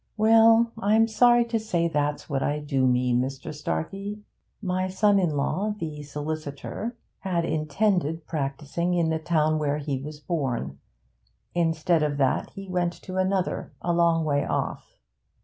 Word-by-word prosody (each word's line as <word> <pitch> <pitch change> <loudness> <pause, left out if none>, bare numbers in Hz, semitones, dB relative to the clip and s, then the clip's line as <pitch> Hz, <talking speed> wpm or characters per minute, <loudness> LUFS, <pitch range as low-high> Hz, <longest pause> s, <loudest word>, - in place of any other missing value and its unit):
'Well, 225 +1 +6
I'm 220 +1 +4
sorry 240 +1 +5
to 230 -1 -1
say 175 -6 0
that's 145 -2 -1
what 135 -3 -1
I 145 - 0
do 140 -3 0
mean, 125 0 +2
Mr. 135 +4 -5
Starkey. 195 - -4 0.4
My 185 -2 -1
son 200 +2 +3
in 165 -6 0
law 200 +9 -1
the 155 -5 -5
solicitor 150 - -5 0.2
had 175 -3 -1
intended 165 0 0
practising 155 +4 -2
in 165 -2 +2
the 160 - 0
town 155 -1 +1
where 145 -1 0
he 140 -3 -3
was 150 +1 -8
born; 130 - -3 0.7
instead 165 -1 +2
of 150 -1 0
that 135 -2 +1
he 195 0 -8
went 180 -1 0
to 185 0 -6
another 185 0 -1
a 175 - -1
long 170 -1 +3
way 145 -2 +1
off. - - -3
165 Hz, 150 wpm, -26 LUFS, 145-190 Hz, 0.7 s, Well